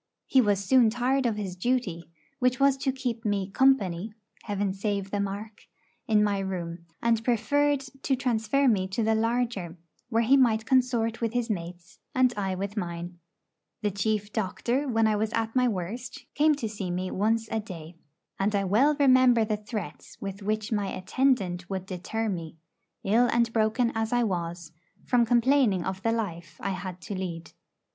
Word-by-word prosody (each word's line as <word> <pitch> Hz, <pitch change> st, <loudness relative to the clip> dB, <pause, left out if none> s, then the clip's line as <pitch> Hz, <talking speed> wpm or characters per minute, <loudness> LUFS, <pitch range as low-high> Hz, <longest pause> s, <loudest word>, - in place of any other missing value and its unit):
He 265 Hz, -, +4 dB
was 200 Hz, -3 st, +1 dB
soon 250 Hz, 0 st, +5 dB
tired 250 Hz, +3 st, +1 dB
of 225 Hz, -, 0 dB
his 195 Hz, -4 st, -4 dB
duty, 185 Hz, -6 st, -1 dB, 0.3 s
which 250 Hz, +1 st, +2 dB
was 275 Hz, -1 st, +5 dB
to 270 Hz, 0 st, 0 dB
keep 245 Hz, -3 st, -4 dB
me 200 Hz, -3 st, -1 dB
'company' 210 Hz, -6 st, +2 dB, 0.3 s
(Heaven 205 Hz, -2 st, -1 dB
save 200 Hz, -1 st, -2 dB
the 205 Hz, -, -1 dB
mark!) 200 Hz, +2 st, -5 dB, 0.4 s
in 215 Hz, -1 st, +4 dB
my 205 Hz, -1 st, +1 dB
room, 170 Hz, -3 st, -5 dB, 0.2 s
and 230 Hz, -1 st, +2 dB
preferred 280 Hz, +5 st, +2 dB, 0.2 s
to 270 Hz, -, +1 dB
transfer 250 Hz, +2 st, +1 dB
me 195 Hz, -6 st, +2 dB
to 195 Hz, +4 st, -2 dB
the 220 Hz, +1 st, +2 dB
larger, 225 Hz, -6 st, -1 dB, 0.3 s
where 230 Hz, -1 st, +2 dB
he 255 Hz, +5 st, +5 dB
might 225 Hz, -4 st, +3 dB
consort 240 Hz, -3 st, +1 dB
with 230 Hz, -1 st, -1 dB
his 245 Hz, -2 st, 0 dB
mates, 175 Hz, 0 st, -7 dB, 0.2 s
and 255 Hz, -1 st, +4 dB
I 195 Hz, -2 st, -1 dB
with 200 Hz, +2 st, -4 dB
mine. 175 Hz, -2 st, -5 dB, 0.6 s
The 210 Hz, -, +1 dB
chief 205 Hz, +1 st, -1 dB
doctor, 240 Hz, +6 st, -1 dB
when 225 Hz, -3 st, +2 dB
I 215 Hz, -1 st, +3 dB
was 215 Hz, +1 st, -1 dB
at 225 Hz, +1 st, -1 dB
my 250 Hz, -1 st, +4 dB
worst, 225 Hz, +4 st, -4 dB
came 305 Hz, +1 st, +4 dB
to 245 Hz, -6 st, -3 dB
see 205 Hz, -3 st, -5 dB
me 180 Hz, +1 st, -2 dB
once 225 Hz, +3 st, +1 dB
a 225 Hz, -, 0 dB
day. 175 Hz, -6 st, -9 dB, 0.5 s
And 205 Hz, +2 st, +1 dB
I 200 Hz, -, +1 dB
well 240 Hz, +11 st, +3 dB
remember 255 Hz, -4 st, +5 dB
the 215 Hz, 0 st, 0 dB
threats 210 Hz, -6 st, -7 dB
with 195 Hz, 0 st, -6 dB
which 215 Hz, +2 st, -2 dB
my 205 Hz, -2 st, 0 dB
'attendant' 185 Hz, -4 st, 0 dB
would 190 Hz, -1 st, -3 dB
deter 195 Hz, +5 st, -3 dB
me, 165 Hz, -5 st, -4 dB, 0.5 s
ill 230 Hz, +5 st, +4 dB
and 235 Hz, -1 st, +2 dB
broken 225 Hz, +2 st, +2 dB
as 225 Hz, 0 st, -1 dB
I 245 Hz, 0 st, +2 dB
was, 170 Hz, -5 st, -3 dB, 0.3 s
from 240 Hz, -2 st, +3 dB
complaining 240 Hz, -6 st, +3 dB
of 190 Hz, 0 st, -3 dB
the 225 Hz, -, +1 dB
life 170 Hz, -8 st, -4 dB
I 195 Hz, -, -2 dB
had 185 Hz, -1 st, -6 dB
to -, -, -6 dB
lead. 175 Hz, -3 st, -5 dB
215 Hz, 180 wpm, -27 LUFS, 190-240 Hz, 0.6 s, soon